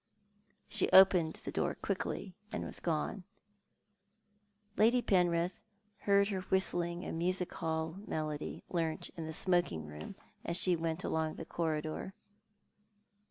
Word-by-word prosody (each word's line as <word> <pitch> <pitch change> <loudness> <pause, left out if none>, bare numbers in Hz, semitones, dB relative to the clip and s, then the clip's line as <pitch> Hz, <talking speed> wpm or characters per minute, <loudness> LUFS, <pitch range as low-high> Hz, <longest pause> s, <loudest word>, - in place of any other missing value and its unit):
Slio 210 - +1
opened 180 -4 +7
the - - -7
door - - 0
quickly, 190 - -3 0.2
and - - -3
was - - -3
gone. 170 +3 -1 1.5
Lady 235 +3 +5
Penrith 180 -4 +2 0.4
heard 200 0 +3
her 190 -2 -2
whistling 175 -2 0
a - - -4
music 180 +2 0
hall 160 +1 -2
melody, 155 -1 -3
learnt 165 -3 -2
in 165 -2 -5
the - - -4
smoking 175 - +1
room, 75 +1 -8 0.3
as 170 - +1
she 180 -1 +4
went 165 +1 -2
along 160 -1 -1
the - - -7
corridor. 160 +3 -3
170 Hz, 125 wpm, -33 LUFS, 160-185 Hz, 1.5 s, opened